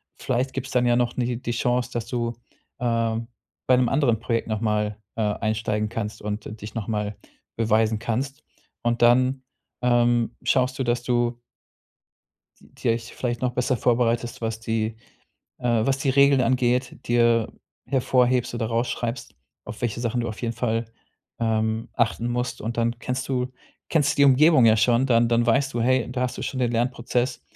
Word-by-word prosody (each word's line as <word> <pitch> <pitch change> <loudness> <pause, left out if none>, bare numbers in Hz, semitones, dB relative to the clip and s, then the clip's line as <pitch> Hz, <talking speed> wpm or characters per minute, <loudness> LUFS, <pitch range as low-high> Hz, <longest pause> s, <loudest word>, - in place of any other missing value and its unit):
vielleicht 130 +1 -1
gibt's 135 +1 -5
dann 125 -1 +2
ja 120 - +3
noch 120 0 0
ni 120 -1 -1
die 120 - -3
Chance, 125 +1 0
dass 120 -1 -3
du, 120 -1 -2 0.5
ähm, 115 -1 0 0.4
bei 130 - +6
'nem 125 -2 +2
anderen 135 -6 +2
Projekt 115 0 -1
nochmal, 105 -1 -1 0.2
äh, - - 0
einsteigen 105 0 -1
kannst 110 -1 -5
und 105 +1 -5
dich 105 - -8
nochmal 105 -2 -2 0.4
beweisen 110 -1 +2
kannst. 135 +5 -3 0.4
Und 120 0 0
dann, 130 +2 +4 0.4
ähm, 120 -1 +2
schaust 130 0 +1
du, - - +1
dass 120 0 0
du 120 -1 0 1.2
Die - - -4
euch 115 0 -2
vielleicht 120 -1 -3
noch 125 -1 0
besser 125 +1 +1
vorbereitest, 120 +1 +1
was 110 -1 -3
die, 115 -1 -1 0.7
äh 120 -2 +1
was 135 0 +1
die 140 - 0
Regeln 140 0 +5
angeht, 125 +1 +1
dir 115 -1 +3 0.3
hervorhebst 125 -2 +2
oder 115 - -1
raus 115 +2 0
schreibst, 120 - -4 0.3
auf 105 - -8
welche 120 -1 -2
Sachen 120 0 -1
du 120 - -2
auf 110 +1 -7
jeden 115 -1 -2
Fall, 115 -1 -1 0.5
ähm, 110 -1 0
achten 115 0 0
musst. 125 0 -2
Und 115 +2 -4
dann 115 0 0
kennst 130 +2 -3
du 125 -1 -1 0.4
kennst 150 -4 +2
die 140 - +6
Umgebung 140 0 +6
ja 110 -1 +5
schon, 120 +3 +3
dann 120 -2 +3
dann 115 0 +2
weißt 135 +4 +2
du: 120 - 0
„Hey, 130 0 +2
da 125 - -2
hast 125 - -3
du - - -5
schon 130 - -3
den 120 -2 +1
Lernprozess.“ 120 +1 -1
120 Hz, 170 wpm, -24 LUFS, 115-125 Hz, 1.2 s, bei